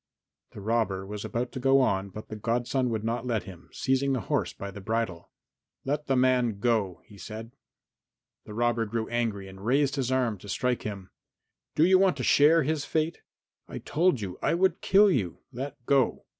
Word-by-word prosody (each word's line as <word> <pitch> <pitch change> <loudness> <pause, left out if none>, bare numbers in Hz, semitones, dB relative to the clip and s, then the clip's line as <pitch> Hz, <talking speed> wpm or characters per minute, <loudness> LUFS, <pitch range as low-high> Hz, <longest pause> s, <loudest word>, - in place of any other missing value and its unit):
The 105 - -9
robber 105 -3 0
was 105 +1 -6
about 120 +1 -3
to - - -5
go 135 +1 +4
on, 100 -6 +1
but 110 +3 -10
the 110 - -5
godson 120 +4 0
would 110 -2 -2
not 115 +2 -2
let 115 -4 0
him, 90 -3 -12
seizing 135 +1 +1
the 130 - -1
horse - - -1
by 100 0 -7
the 100 - -9
bridle. 110 -4 -2 0.6
"Let 145 +2 -2
the 135 - +2
man 125 -4 +2
go," 105 -5 0
he 100 -2 -15
said. 110 +3 -8 0.9
The 105 - -9
robber 120 -1 +1
grew 110 +1 -2
angry 115 -5 -1
and 95 0 -12
raised 140 +4 +2
his 130 -2 -1
arm 125 -6 +1
to 100 - -11
strike 125 +5 0
him. 100 -3 -6 0.6
"Do 155 - +5
you 185 +1 +5
want 190 -1 +3
to - - -3
share 155 +3 +5
his 150 +1 -1
fate? 160 +2 -1 0.5
I - - -7
told 165 -6 +1
you 95 -3 -6
I - - +2
would 185 0 +2
kill 200 +1 +5
you. 95 - -1
Let 135 +3 -5
go!" 135 -2 +2
120 Hz, 195 wpm, -28 LUFS, 105-135 Hz, 0.9 s, Do